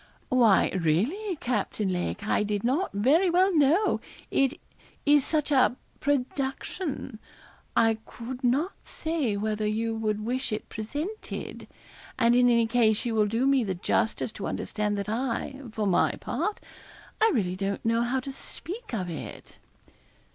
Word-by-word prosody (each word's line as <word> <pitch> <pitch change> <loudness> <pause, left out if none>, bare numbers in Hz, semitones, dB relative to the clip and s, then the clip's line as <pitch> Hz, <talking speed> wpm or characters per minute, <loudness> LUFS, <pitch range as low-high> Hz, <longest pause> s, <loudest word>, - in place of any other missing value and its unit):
'Why, 240 -6 +5
really, 220 - 0
Captain 220 -7 -1
Lake, 180 +3 -3
I - - +2
did 205 -1 -1
not 280 +11 +1
very 285 - +3
well 365 +2 +3
know, 315 +8 +4 0.3
it 275 0 +2 0.5
is 290 -1 +5
such 305 0 0
a 260 -3 +4 0.2
production 270 - -2 0.6
I 225 -1 +4
could 250 +2 -7
not 275 +10 +2
say 310 -10 -2
whether 215 0 -1
you 225 +2 -1
would 215 -1 -2
wish 255 +1 -2
it 215 - -3
presented; 295 - -5 0.5
and 235 +1 +4
in 245 0 +5
any 235 -1 +4
case 225 -2 +2
you 235 - -1
will 215 -1 +3
do 230 +5 0
me 275 -2 +4
the 190 -3 -2
justice 220 +5 0
to 205 - -5
understand 210 -1 -2
that 200 0 -3
I, 250 +4 -2
for 215 -1 -2
my 190 -3 +3
part 420 - -3 0.6
I 445 - +6
really 185 -8 0
don't 195 +2 -3
know 230 +1 +2
how 245 +2 +1
to 275 - -6
speak 350 - -7
of 185 -4 -2
it. 165 -3 -8
240 Hz, 150 wpm, -27 LUFS, 215-280 Hz, 0.6 s, I